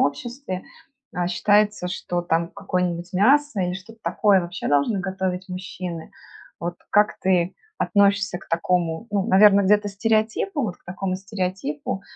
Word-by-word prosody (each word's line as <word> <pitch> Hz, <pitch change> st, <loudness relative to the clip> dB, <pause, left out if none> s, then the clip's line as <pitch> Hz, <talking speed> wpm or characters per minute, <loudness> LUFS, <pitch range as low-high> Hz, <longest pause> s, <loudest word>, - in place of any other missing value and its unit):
обществе, 185 Hz, -, -2 dB, 0.5 s
а, 175 Hz, 0 st, -1 dB
считается, 205 Hz, +1 st, +2 dB
что 175 Hz, -1 st, -3 dB
там 170 Hz, 0 st, 0 dB
какое-нибудь 180 Hz, -2 st, -2 dB
мясо, 265 Hz, +4 st, +3 dB
или 180 Hz, 0 st, -1 dB
что-то 220 Hz, +4 st, -11 dB
такое 200 Hz, -3 st, +3 dB
вообще 175 Hz, +1 st, -5 dB
должны 145 Hz, +9 st, +2 dB
готовить 190 Hz, 0 st, -3 dB
мужчины. 180 Hz, -2 st, -6 dB, 0.5 s
Вот, 175 Hz, +1 st, -3 dB
как 210 Hz, +1 st, +3 dB
ты 185 Hz, -1 st, +1 dB, 0.2 s
относишься 200 Hz, -2 st, +2 dB
к -, -, -17 dB
такому, 170 Hz, +3 st, 0 dB
ну, 200 Hz, -2 st, 0 dB
наверно, 200 Hz, +1 st, +7 dB
где-то 205 Hz, +1 st, +3 dB
стереотипу, 220 Hz, -, 0 dB
вот 190 Hz, -6 st, -3 dB
к -, -, -37 dB
такому 185 Hz, +1 st, -3 dB
стереотипу, 185 Hz, -3 st, -4 dB
190 Hz, 140 wpm, -23 LUFS, 175-205 Hz, 0.5 s, наверно